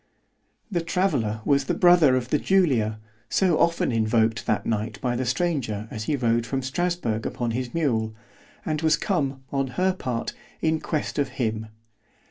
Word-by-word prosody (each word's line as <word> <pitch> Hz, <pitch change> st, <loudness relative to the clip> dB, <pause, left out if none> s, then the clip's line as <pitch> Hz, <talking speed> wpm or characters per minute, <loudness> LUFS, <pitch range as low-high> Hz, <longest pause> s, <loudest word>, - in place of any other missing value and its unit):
_ -, -, -44 dB, 0.7 s
The 175 Hz, -3 st, 0 dB
traveller 145 Hz, -, 0 dB
was 140 Hz, -1 st, +3 dB
the -, -, 0 dB
brother 175 Hz, -7 st, +6 dB
of 125 Hz, -1 st, -2 dB
the 150 Hz, -, +2 dB
Julia, 130 Hz, -, +2 dB, 0.3 s
so 180 Hz, -5 st, +2 dB
often 170 Hz, -5 st, +2 dB
invoked 110 Hz, 0 st, +1 dB
that 110 Hz, -, 0 dB
night 110 Hz, 0 st, -2 dB
by 125 Hz, -1 st, -1 dB
the 125 Hz, +1 st, -2 dB
stranger 130 Hz, -7 st, -1 dB
as 110 Hz, -4 st, -5 dB
he 150 Hz, -, +1 dB
rode 120 Hz, -3 st, +1 dB
from 130 Hz, +3 st, -3 dB
Strasburg 135 Hz, -6 st, -1 dB
upon 120 Hz, -1 st, -2 dB
his 125 Hz, +3 st, -3 dB
mule; 110 Hz, -9 st, 0 dB, 0.5 s
and 155 Hz, -1 st, -1 dB
was 160 Hz, -2 st, +3 dB
come, 140 Hz, -8 st, -1 dB
on 135 Hz, -1 st, 0 dB
her 185 Hz, +1 st, +3 dB
part, 125 Hz, -10 st, -3 dB, 0.3 s
in 160 Hz, 0 st, +1 dB
quest 155 Hz, -2 st, -2 dB
of 140 Hz, -2 st, +1 dB
him. 110 Hz, -3 st, -1 dB
130 Hz, 170 wpm, -25 LUFS, 115-160 Hz, 0.7 s, brother